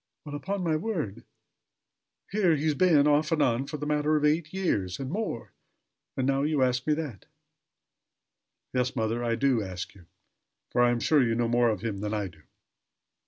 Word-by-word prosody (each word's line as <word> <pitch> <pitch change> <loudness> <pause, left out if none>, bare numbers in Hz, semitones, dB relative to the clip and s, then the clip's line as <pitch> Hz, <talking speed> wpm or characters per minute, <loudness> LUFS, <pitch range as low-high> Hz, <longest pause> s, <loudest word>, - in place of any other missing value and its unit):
"Well! 145 - -7
upon 190 +6 -3
my 160 -2 +1
word! 155 - -4 1.1
Here 195 -5 +3
he's 155 +1 +1
been, 155 -2 +4
off 150 +1 +3
and 165 - +2
on, 125 +3 +1
for 150 - -5
the 150 - -5
matter 150 +1 +1
of 150 0 +2
eight 155 +1 +1
years 105 - -1
and 135 0 -4
more; 200 - -4 0.6
and 130 - +1
now 135 0 +2
you 145 -2 +2
ask 125 +1 0
me 150 - +3
that!" 145 - -6 1.5
"Yes, 125 0 0
mother, 115 0 -1
I 115 -1 +1
do 125 -1 +2
ask 95 -2 -6
you; 90 -4 -18 0.6
for 120 - +2
I 120 - +5
am 120 -1 0
sure 150 -3 +4
you 115 -2 +2
know 120 0 +1
more 120 0 +3
of 105 -4 -2
him 105 -3 -3
than 105 +1 -2
I 100 -2 -2
do." 80 -2 -20
135 Hz, 190 wpm, -28 LUFS, 115-155 Hz, 1.5 s, I